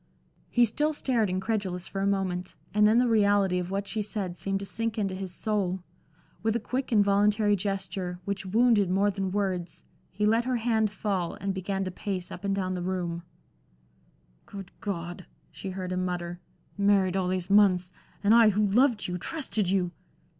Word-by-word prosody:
He 240 -1 +4
still 300 +8 0
stared 240 -8 +1
incredulous 185 -1 -2
for 195 - -4
a 195 - +1
moment, 185 -2 -1 0.2
and 210 0 +5
then 220 +2 +4
the 245 0 +4
reality 205 -4 +3
of 180 0 -4
what 195 +1 -2
she 220 - -2
said 200 -3 -3
seemed 195 +1 -2
to - - -4
sink 225 +2 -2
into 195 -3 -1
his 185 -1 -5
soul. 190 -1 -1 0.6
With 220 +1 0
a - - +2
quick, 255 +4 -3
involuntary 205 0 +3
gesture, 190 -2 -3
which 200 -1 -3
wounded 215 0 +3
more 200 +2 +2
than 195 -1 -2
words, 185 -4 -2 0.3
he 210 +3 -1
let 225 +3 +3
her 255 -1 0
hand 225 -2 +1
fall, 195 -4 -2
and 195 0 -3
began 195 +1 -2
to 185 - -3
pace 185 -1 -4
up - - -8
and 200 -1 0
down 185 -1 -1
the 180 - -3
room. 175 -2 -2 1.3
"Good 195 -2 -9
God!" 175 -2 -5 0.2
she 195 - -7
heard 185 -1 -5
him 185 0 -1
mutter. 175 -1 -3 0.4
"Married 200 -2 +3
all 190 -2 +1
these 185 0 -2
months! 185 -3 +4 0.3
and 205 +2 +5
I, 230 -2 +7
who 210 +1 +2
loved 230 +2 +3
you, 180 0 -3
trusted 220 - -2
you!" 185 -2 +1
195 Hz, 180 wpm, -28 LUFS, 185-210 Hz, 1.3 s, I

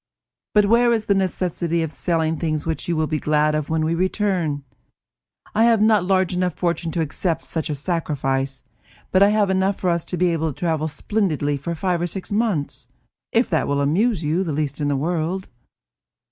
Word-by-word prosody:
"But 210 -1 +6
where 235 +3 +4
is 225 -2 0
the 200 - +3
necessity 175 -3 -1
of 160 - -4
selling 160 -1 0
things 155 -2 -2
which 160 -1 -3
you 170 - 0
will 155 0 +1
be 155 0 -2
glad 150 +1 +2
of 155 -1 -2
when 160 -1 +1
we 160 - +1
return? 180 -5 0 0.9
I 220 +2 +4
have 230 -2 +4
not 215 -1 +4
a - - -4
large 185 -1 +2
enough 180 -2 0
fortune 170 -1 -1
to 165 - 0
accept 160 +2 -2
such 160 -2 -3
a 150 - -1
sacrifice; 135 -4 -1 0.5
but 185 - +3
I 200 - +7
have 210 -2 +2
enough 190 +1 +1
for 180 - +1
us 170 -1 0
to 180 - -3
be 175 0 +2
able 160 -2 -1
to 145 - -19
travel 160 -3 0
splendidly 155 -4 -1
for 155 +5 -4
five 175 +1 -1
or 175 - 0
six 190 +3 -5
months, 205 -9 0 0.4
if - - +3
that - - +1
will 140 0 0
amuse 170 +7 +1
you 160 +5 +1
the 165 -5 -3
least 145 0 -2
in 145 - +1
the 145 -1 +1
world." 170 +5 -2
170 Hz, 205 wpm, -22 LUFS, 155-190 Hz, 0.9 s, I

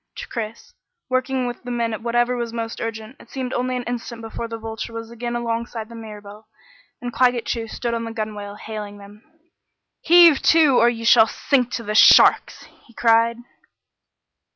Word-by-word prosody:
To - - -8
Chris, 230 - -7 0.4
working 255 0 -1
with 245 -1 -5
the 245 - -9
men 235 -2 -2
at 220 - -6
whatever 240 +1 0
was 235 -1 -4
most 230 -1 -5
urgent, 225 +3 -6
it - - -17
seemed 260 -2 -5
only 255 +1 -1
an 250 - -4
instant 235 -1 -6
before 225 +1 -6
the 230 0 -6
Vulture 225 +1 -7
was 230 0 -7
again 240 0 -5
alongside 230 -1 -4
the 235 - -11
Mirabelle, 210 -1 -11 0.6
and 245 -1 -5
Claggett 245 -2 +2
Chew 230 -1 -3
stood 235 +1 -4
on 230 0 -3
the 230 - -6
gunwale 210 -2 -6
hailing 210 -1 -8
them. 205 +1 -15 0.8
"Heave 340 -3 +6
to, 310 -6 +4
or 235 - +5
you 230 -1 -5
shall 225 -1 +6
sink 250 -1 0
to 235 - -3
the 210 -1 -4
sharks!" 215 - +5 0.2
he 235 - -21
cried. 230 0 +3
230 Hz, 180 wpm, -21 LUFS, 225-245 Hz, 0.8 s, Heave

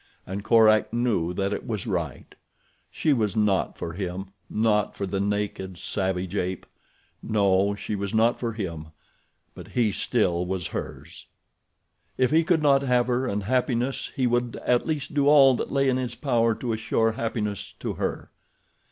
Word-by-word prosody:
And 95 +2 -5
Korak 110 -1 +5
knew 115 -8 0
that 100 +1 -1
it - - -5
was 110 -4 -3
right. 85 - -4 0.6
She 155 - +1
was 110 -5 0
not 105 -3 +1
for 85 - -5
him—not 100 +3 -2
for 100 - -3
the 95 +1 -2
naked, 100 -2 -2
savage 95 -1 -2
ape. 90 0 -2 0.6
No, 100 -2 +2
she 105 - -4
was 100 -1 -3
not 115 +2 +2
for 115 -2 -2
him; 85 -7 -5 0.7
but - - -11
he 115 -4 +1
still 90 -5 +1
was 90 -1 -3
hers. - - -7 0.9
If 130 0 +2
he 160 +2 +4
could 160 -2 +2
not 140 -2 +5
have 125 -3 +2
her 125 +1 0
and 100 -2 -2
happiness, 125 +3 0
he 130 - +1
would 120 -1 0
at 125 -1 +2
least 150 -4 -3
do 145 -1 +2
all 140 -3 +7
that - - -3
lay 135 0 +2
in 130 -1 +2
his 125 -2 -3
power 115 -6 +1
to 120 -1 -3
assure 110 0 +1
happiness 110 -3 -3
to - - -2
her. - - -4
110 Hz, 165 wpm, -25 LUFS, 95-125 Hz, 0.9 s, all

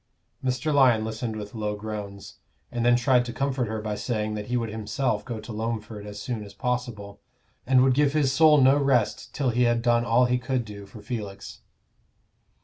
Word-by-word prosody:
Mr. 130 +4 0
Lyon 125 -6 +4
listened 110 0 -4
with 105 -1 -7
low 105 -2 -2
groans, 105 -2 -7 0.3
and 120 -1 -2
then 120 0 +5
tried 125 0 +3
to 120 - -6
comfort 135 -2 -1
her 110 0 -3
by 105 0 -3
saying 110 -1 -2
that 105 -1 -5
he 125 - 0
would 115 -2 -2
himself 110 +4 -2
go 120 -3 -5
to 110 +2 -9
Loamford 110 -1 -4
as 105 0 -8
soon 115 -1 -4
as 100 - -12
possible, 120 -5 -3 0.5
and 130 -1 +5
would 130 -1 +4
give 145 +1 +2
his 145 -4 +2
soul 155 0 +6
no 135 +1 +5
rest 135 -5 +1
till 135 -4 0
he 120 +2 0
had 120 -1 +2
done 120 -1 +3
all 120 +2 +3
he 125 0 +1
could 125 -1 -2
do 100 -2 -10
for 105 +1 -13
Felix. 105 -4 -6
120 Hz, 200 wpm, -26 LUFS, 105-125 Hz, 0.5 s, soul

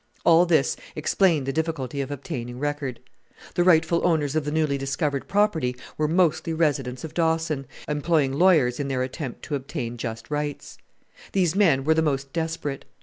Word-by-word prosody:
All 170 +1 +6
this 160 -5 +3 0.2
explained 155 -1 +2
the 135 - -2
difficulty 145 -4 -2
of 135 - -4
obtaining 125 -3 -5
record. 145 -3 -3 0.5
The 175 - +2
rightful 170 -1 +4
owners 155 -4 +1
of 155 -2 0
the 150 - -2
newly 155 -2 +1
discovered 140 +1 -2
property 175 -12 +1 0.2
were 155 - 0
mostly 165 -1 +2
residents 135 -6 0
of 160 - -7
Dawson, 160 -4 0 0.2
employing 150 -2 +1
lawyers 150 -6 +4
in 140 - -1
their 130 -2 0
attempt 130 0 -6
to - - -6
obtain 130 -3 -4
just 115 +2 -6
rights. 150 -1 -4 0.5
These 180 -3 +2
men 165 -10 +4
were 160 +3 +4
the 160 - +2
most 140 -3 -1
desperate. 160 -4 -3
150 Hz, 165 wpm, -25 LUFS, 135-165 Hz, 0.5 s, All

